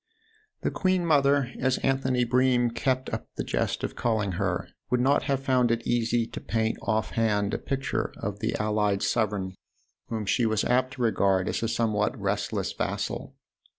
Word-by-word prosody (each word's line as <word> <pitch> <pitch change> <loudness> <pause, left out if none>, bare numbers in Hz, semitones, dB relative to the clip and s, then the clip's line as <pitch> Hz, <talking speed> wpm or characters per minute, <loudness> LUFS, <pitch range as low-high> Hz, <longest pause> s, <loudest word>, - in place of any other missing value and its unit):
The - - 0
queen 185 -2 +1
mother, 140 -4 +3
as 130 0 +2
Anthony 130 -2 +2
Bream 125 0 +3
kept 130 +2 -1
up - - -3
the - - -2
jest - - -1
of - - -3
calling 110 -4 0
her, 85 - -1 0.2
would 125 0 +2
not 135 +3 +3
have 135 -2 0
found 130 -3 +3
it 115 0 0
easy 120 0 +1
to - - -8
paint 110 0 0
off 110 -1 0
hand 105 -3 +1
a - - -1
picture 135 -1 -2
of 100 0 -4
the 110 +1 -1
allied 105 -2 +1
sovereign 105 -5 0 0.5
whom 110 -2 -3
she 100 - +1
THE 115 - +3
OTHER 110 - 0
HOUSE 110 - +2
7 - - 0
was 125 - +5
apt 130 - -14
to 130 - -7
regard 95 -4 +2
as - - -2
a 115 - 0
somewhat 110 -2 0
restless - - -1
vassal. - - -3
115 Hz, 190 wpm, -27 LUFS, 110-130 Hz, 0.5 s, was